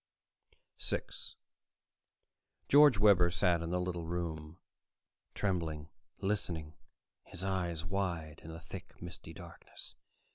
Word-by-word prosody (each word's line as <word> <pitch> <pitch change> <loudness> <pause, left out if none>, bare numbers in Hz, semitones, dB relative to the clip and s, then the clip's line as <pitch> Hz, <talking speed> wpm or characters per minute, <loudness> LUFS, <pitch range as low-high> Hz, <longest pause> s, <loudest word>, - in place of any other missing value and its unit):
6 - - -3 1.3
George 145 -4 +8
Webber 95 -4 +7
sat 90 -1 +3
in 85 - -3
the 90 +1 +1
little 90 -2 -2
room, 80 -2 -3 0.8
trembling, 80 -6 -1 0.3
listening, 85 -6 -2 0.5
his 90 - -6
eyes 90 -4 -1
wide 85 -4 -2
in 80 - -7
the 80 +1 -8
thick, 90 +2 -9
misty - - -8
darkness. - - -10
85 Hz, 105 wpm, -34 LUFS, 80-95 Hz, 1.3 s, George